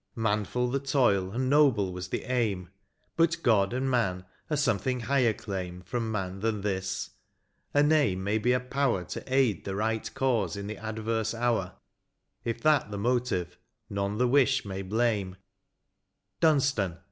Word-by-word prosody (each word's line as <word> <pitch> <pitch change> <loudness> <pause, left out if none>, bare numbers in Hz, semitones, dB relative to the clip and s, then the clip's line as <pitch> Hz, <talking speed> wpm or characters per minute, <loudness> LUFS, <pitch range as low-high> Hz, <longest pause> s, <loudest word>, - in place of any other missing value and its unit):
Manftil 110 +3 0
the 140 - +1
toil, 125 -9 +2
and 125 +6 -2
noble 130 -10 +3
was 90 -1 -5
the - - -3
aim 105 -8 -1 0.2
— - - -26
Sut 170 0 +4
God 100 -5 +3
and 130 +2 -1
man 95 -8 0 0.2
a 150 - 0
something 125 -2 0
higher 125 0 +2
claim 90 -4 -5
From 115 +5 -3
man 95 -2 -3
than 110 -1 -1
this; 95 -2 -2 0.6
a 145 - +4
name 145 -12 +2
may 105 +3 +1
be 125 +4 +2
a 125 - +3
power 125 -6 0
To - - -6
aid 130 -8 +2
the 95 - -4
right 110 +2 -1
cause 115 -10 0
in 100 - -5
the 105 0 -5
adverse 110 +1 -2
hour; 115 -6 0 0.7
If 115 0 -3
that 155 -7 +3
the 105 - -5
motive, 100 -6 -1 0.3
none 100 +1 -2
the 125 +2 +3
wish 130 -4 +3
may 95 -1 -4
blame: 105 -2 0 1.0
Dunstan 135 - +2
110 Hz, 160 wpm, -28 LUFS, 95-125 Hz, 1.0 s, Sut